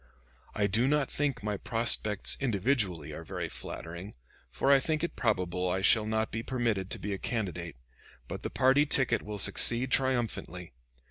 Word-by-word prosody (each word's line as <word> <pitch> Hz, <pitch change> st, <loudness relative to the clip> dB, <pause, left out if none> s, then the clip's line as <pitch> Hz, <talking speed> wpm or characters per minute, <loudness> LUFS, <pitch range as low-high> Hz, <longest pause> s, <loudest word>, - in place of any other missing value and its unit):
I 105 Hz, -, +2 dB
do 110 Hz, +6 st, +2 dB
not 145 Hz, -1 st, +1 dB
think 140 Hz, -6 st, -1 dB
my 105 Hz, -1 st, -1 dB
prospects 110 Hz, -1 st, +1 dB
individually 105 Hz, -, 0 dB
are -, -, -7 dB
very -, -, -4 dB
flattering, 85 Hz, +5 st, -7 dB, 0.3 s
for 135 Hz, -, +1 dB
I 140 Hz, -, +7 dB
think 155 Hz, +3 st, -1 dB
it 170 Hz, -, -2 dB
probable 90 Hz, -4 st, 0 dB
I 95 Hz, +2 st, 0 dB
shall 110 Hz, +1 st, +4 dB
not 110 Hz, 0 st, 0 dB
be 115 Hz, -, -3 dB
permitted 115 Hz, -7 st, -1 dB
to -, -, -4 dB
be 100 Hz, 0 st, -3 dB
a 95 Hz, -, -4 dB
candidate; 95 Hz, -8 st, -3 dB, 0.5 s
but -, -, -6 dB
the -, -, -3 dB
party 135 Hz, +3 st, +3 dB
ticket 130 Hz, -3 st, +2 dB
will 105 Hz, 0 st, -6 dB
succeed 120 Hz, +5 st, +2 dB
triumphantly. 120 Hz, -, -1 dB
110 Hz, 170 wpm, -30 LUFS, 95-130 Hz, 0.5 s, I